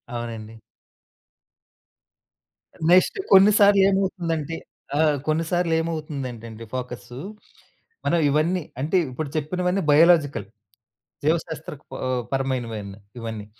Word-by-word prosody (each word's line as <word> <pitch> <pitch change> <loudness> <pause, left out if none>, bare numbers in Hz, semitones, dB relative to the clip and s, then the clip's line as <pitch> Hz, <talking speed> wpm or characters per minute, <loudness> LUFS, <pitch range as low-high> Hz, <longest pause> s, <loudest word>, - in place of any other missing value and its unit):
అవునండి. 115 -1 -6 2.3
నెక్స్ట్ 185 - +5
కొన్నిసార్లు 200 0 +7
ఏమవుతుందంటే 170 -5 -1 0.4
ఆహ్, 155 -2 +3
కొన్నిసార్లు 165 +2 0
ఏమవుతుందంటే 145 -8 -4
అండి 115 +1 -10
ఫోకస్సు. 125 -1 -6 0.9
మనం 170 - +2
ఇవన్నీ 165 +5 +1 0.2
అంటే 160 +6 +1
ఇప్పుడు 140 +3 -5
చెప్పినవన్నీ 180 +5 -1
బయోలాజికల్. 155 - +4 0.8
జీవశాస్త్ర 160 -1 -1 0.3
ఆహ్, 130 -1 0
పరమైనవి 130 -5 -2 0.4
ఇవన్నీ. 110 -2 -6
155 Hz, 85 wpm, -24 LUFS, 125-175 Hz, 2.3 s, కొన్నిసార్లు